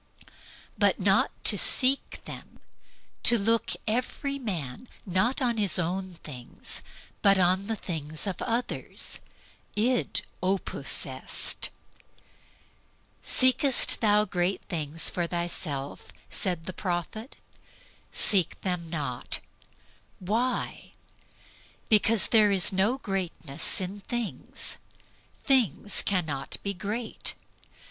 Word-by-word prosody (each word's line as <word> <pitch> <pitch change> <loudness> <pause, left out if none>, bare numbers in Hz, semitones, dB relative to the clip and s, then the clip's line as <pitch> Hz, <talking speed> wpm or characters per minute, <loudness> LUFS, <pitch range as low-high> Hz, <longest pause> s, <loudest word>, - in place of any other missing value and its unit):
But - - +3
not - - +3
to - - +6
seek 265 +1 +1
them, - - -10 0.6
to 235 - +8
look 225 +2 0
every 255 +5 -2
man 185 - -5 0.2
not 215 +8 0
on 240 -2 +1
his 200 -6 +4
own 185 +2 -2
things, 130 -7 -4 0.4
but 200 -1 +5
on 185 +2 +2
the 225 - -1
things 155 -5 -2
of 195 -3 -4
others 235 +1 -2 0.6
that - - -2
is 250 0 +1 0.2
the 190 +2 +2
difficulty. - - -1 1.5
"Seekest 255 +1 +3
thou 210 -1 +4
great 180 -1 -1
things 160 -1 +1
for 175 -1 -1
thyself?" 165 -5 -3 0.2
said 175 -4 0
the 185 - -6
prophet; 190 - -4 0.8
"seek 185 -5 +3
them 180 -3 -3
not." 140 -7 -2 0.8
Why? 225 +7 -2 1.0
Because 220 0 +4
there 215 -2 +6
is 195 -1 +4
no 205 +7 +1
greatness 180 - 0
in 190 +2 -5
things. 235 +1 -3 0.6
Things 230 - +3
cannot 160 -8 -2
be 200 - -1
great. 215 +5 -4
195 Hz, 105 wpm, -27 LUFS, 175-225 Hz, 1.5 s, to